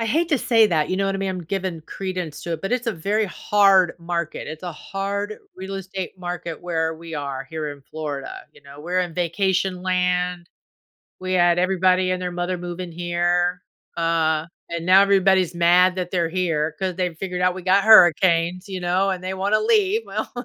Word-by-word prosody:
I 230 - -1
hate 325 +9 +1
to 295 - +2
say 225 -2 +4
that, 155 -4 +1
you 185 - 0
know 195 0 0
what 195 - -1
I - - -2
mean? 195 0 -2
I'm 185 -2 -4
giving 185 -1 -3
credence 180 -5 -5
to 170 - -4
it, 165 - -5
but 195 - -3
it's 250 0 -1
a 230 - +1
very 205 +6 0
hard 195 -3 +3
market, 170 -2 -4
it's 155 +2 -8
a 175 -2 -5
hard 200 +5 -4 0.2
real 190 +1 -7
estate 190 0 -6
market 175 -2 -5
where 160 -2 -1
we 165 0 -9
are, 140 -2 -5
here 155 -2 -4
in 145 - -14
Florida, 145 -2 -6 0.2
you - - -20
know? 140 +1 -13
We're 180 +4 -1
in 175 -2 -3
vacation 185 +1 0
land, 180 -1 0 0.7
we 185 0 -3
had 175 -1 +4
everybody 185 0 +2
and 185 0 -2
their 180 -1 -3
mother 175 +1 -2
moving 175 0 -6
here, 175 +1 0 0.4
uh, 160 -1 +1 0.2
and 170 0 -4
now 190 +2 +7
everybody's 190 -3 +3
mad 180 +2 +4
that 180 -1 -4
they're 170 -3 0
here, 160 -3 -1
'cause 190 -1 -1
they've 180 -3 -2
figured 180 0 -4
out 180 0 +2
we 185 - -7
got 195 +1 +3
hurricanes, 180 -2 +5
you 190 -1 -4
know, 180 +3 +1
and 185 -1 -3
they 185 - -3
wanna 195 +3 +1
leave, 435 -1 +2
well - - -4
180 Hz, 200 wpm, -22 LUFS, 170-190 Hz, 0.7 s, now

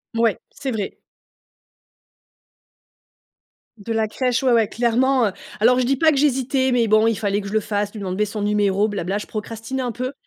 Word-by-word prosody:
Ouais, 230 -2 +2
c'est 270 -2 -5
vrai. 210 -3 -4 2.8
De 210 +3 -7
la 220 -1 +1
crèche, 250 +3 -1
ouais, 255 - +3
ouais, 225 -3 +4
clairement, 245 +2 +2
heu - - -7 0.3
alors 250 +3 +4
je 255 - +1
dis 270 +2 +2
pas 315 +3 +4
que 280 - -1
j'hésitais 265 -2 +1
mais 235 -2 +2
bon, 215 +1 +4
il 230 -2 +1
fallait 205 -2 -1
que 200 - -7
je 200 - -6
le 220 - +3
fasse, 205 -1 -2
lui 215 - -9
demander 190 +2 -1
son 205 0 -5
numéro, 205 0 +2
blabla, 200 -1 -2
je 210 - -5
procrastinais 225 +4 -5
un 245 - -2
peu 255 +3 -4
225 Hz, 195 wpm, -21 LUFS, 210-255 Hz, 2.8 s, ouais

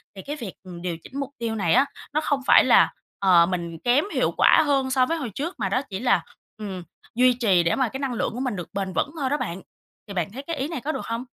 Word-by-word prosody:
Thì 190 - -8
cái 290 +7 -5
việc, 230 -10 -7
ừm, 180 -2 -10
điều 175 -2 -3
chỉnh 275 - -7
mục 275 -2 -3
tiêu 230 -1 -2
này 195 -6 +1
á, 265 +4 +5 0.3
nó 305 - +1
không 285 -3 0
phải - - +7
là, - - +5 0.3
ờ, 180 -4 +6
mình 170 -2 -4
kém 250 - +2
hiệu - - +1
quả - - +6
hơn 270 -2 +1
so 255 -1 +3
với 330 +5 -1
hồi 275 -7 -4
trước, 325 +6 -3
mà 195 - -1
đó 255 +7 +1
chỉ 195 -1 -4
là, 245 0 +2 0.4
ừm, 195 -4 -6 0.3
duy 250 +1 +5
trì 200 -8 +3
để 170 - +1
mà 260 -3 +1
cái 265 - -6
năng 275 -3 -2
lượng 230 - -2
của 245 - -5
mình 255 -4 -2
được 180 -3 -6
bền 195 -1 -3
vững 285 - 0
thôi 270 -2 0
đó 290 - +1
bạn. 175 - -4 0.5
Thì 200 - -7
bạn 175 -2 -2
thấy 255 +6 -7
cái 330 +3 -4
ý 275 -1 -2
này 320 -5 -5
có 300 - -2
được - - -5
hông? 230 +2 -4
240 Hz, 280 wpm, -24 LUFS, 190-275 Hz, 0.5 s, phải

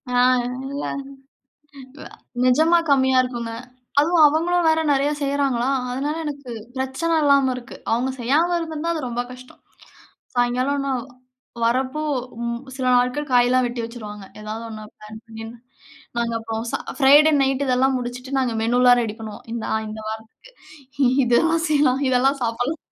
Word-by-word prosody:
ஆ - - +4 0.5
இல்ல. 280 +1 -4 1.2
வ - - -9 0.4
நிஜமா 315 +7 +4
கம்மியா 265 -1 +4
இருக்குங்க. 235 -2 -4 0.5
அதுவும் 320 +1 +5
அவங்களும் 335 +3 +1
வேற 320 0 +3
நெறைய 280 +1 +2
செய்றாங்களா? 275 -3 0 0.2
அதனால 285 +5 -2
எனக்கு 280 -4 -6 0.2
பிரச்சனை 265 +6 -1
இல்லாம 280 -2 +4
இருக்கு. 250 +1 -9 0.2
அவங்க 245 +3 +1
செய்யாம 305 +9 +2
இருந்திருந்தா, 325 0 -3
அது 320 - -3
ரொம்ப 240 0 -2
கஷ்டம். 255 0 -14 0.7
சாயங்காலம் 255 +3 +1
நான் 255 -3 -1 0.6
வரப்போ, 260 +5 0 0.4
ம் 235 +1 -3
சில 260 -1 -3
நாட்கள் 250 +4 0
காயலாம் 245 +1 +4
வெட்டி 240 0 -3
வச்சுருவாங்க. 210 -4 -9 0.2
ஏதாவது 215 +2 -6
ஒண்ண 215 -1 -8
பிளான் 215 +1 -11
பண்ணி, 225 0 -9 0.7
நாங்க 235 -1 0
அப்புறம் 225 0 -4
ச - - -14 0.2
அ - - -9
ஃப்ரைடே 290 +3 +7
நைட்டு 270 +1 +1
இதெல்லாம் 260 +1 +2
முடிச்சுட்டு, 250 +2 -4
நாங்க 250 -3 0
மெனுலாம் 245 +2 +4
ரெடி 215 -2 -3
பண்ணுவோம். 215 -2 -9
இந்த 235 -1 -4
ஆ, - - +2
இந்த 215 +1 -7
வாரத்துக்கு. 220 - -10 0.7
இதெல்லாம் 325 +7 +2
செய்யலாம், 285 -3 +3
இதெல்லாம் 265 +2 +2
சாப்பிடலாம், 245 +7 -1
255 Hz, 145 wpm, -22 LUFS, 235-285 Hz, 1.2 s, ஃப்ரைடே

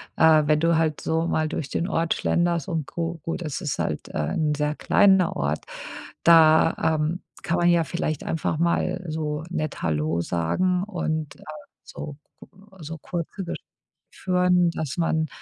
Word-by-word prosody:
äh, 160 -1 +6
wenn 150 0 +3
du 165 +1 +3
halt 160 -2 0
so 160 +1 0
mal 155 -2 0
durch 145 -3 -4
den 170 - -1
Ort 165 -4 +1
schlenderst 170 -3 0
und 160 -4 -2
gu 170 +2 -4
gut, 165 +2 -3
es 155 +1 -4
ist 150 -6 -3
halt, - - -3
äh, - - -4
'n 155 -1 +1
sehr 150 0 -1
kleiner 190 -2 +4
Ort, - - -2 0.6
da, 160 -2 +6 0.3
ähm, 165 +4 -1 0.2
kann 175 -2 0
man 175 0 +3
ja 170 -1 +4
vielleicht 155 -3 -3
einfach 160 -1 -1
mal 170 +2 0
so 155 -1 -3
nett 155 -3 -3
hallo 80 +1 0
sagen 180 - 0
und, 160 -6 -3
äh, - - -16 0.4
so 150 - -8 0.3
k - - -12 0.3
so 160 +1 -6
kurze 175 +4 -5
Gespräche 175 - -6 0.5
führen, 180 -1 +2
dass 155 -1 -4
man 160 -2 +1
165 Hz, 165 wpm, -24 LUFS, 155-175 Hz, 0.6 s, äh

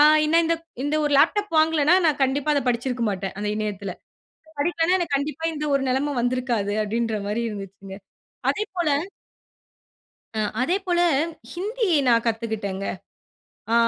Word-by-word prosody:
ஆ - - +8 0.2
ஏன்னா 315 +2 +3
இந்த 335 +1 +2
க் 330 - -26 0.2
இந்த 290 +2 0
ஒரு 295 - 0
லேப்டாப் 415 +3 +2
வாங்கலன்னா, 315 0 +4
நான் 310 -3 +3
கண்டிப்பா 270 +3 +1
அத 285 - +2
படிச்சிருக்க 245 0 -1
மாட்டேன். 195 -1 -3
அந்த 210 0 -2
இணையத்துல. 205 -3 -3 0.7
படிக்கலைன்னா 335 +3 +2
எனக்கு 335 -5 -1
கண்டிப்பா 295 +3 -3
இந்த 300 0 -3
ஒரு 275 - +2
நெலைம 275 +3 0
வந்திருக்காது. 245 -4 0
அப்படீன்ற 225 +1 -1
மாரி 210 +3 -1
இருந்துச்சுங்க. 195 -2 -8 0.5
அதே 425 - -1
போல 345 -4 +1 1.5
அ, - - -1 0.2
அதே 345 +9 +2
போல 350 -2 +1 0.5
ஹிந்தி 430 +6 -2 0.2
நான் 230 -1 +4
கத்துகிட்டங்க. 220 -4 -2 0.9
ஆ, - - +4
265 Hz, 145 wpm, -24 LUFS, 215-320 Hz, 1.5 s, ஆ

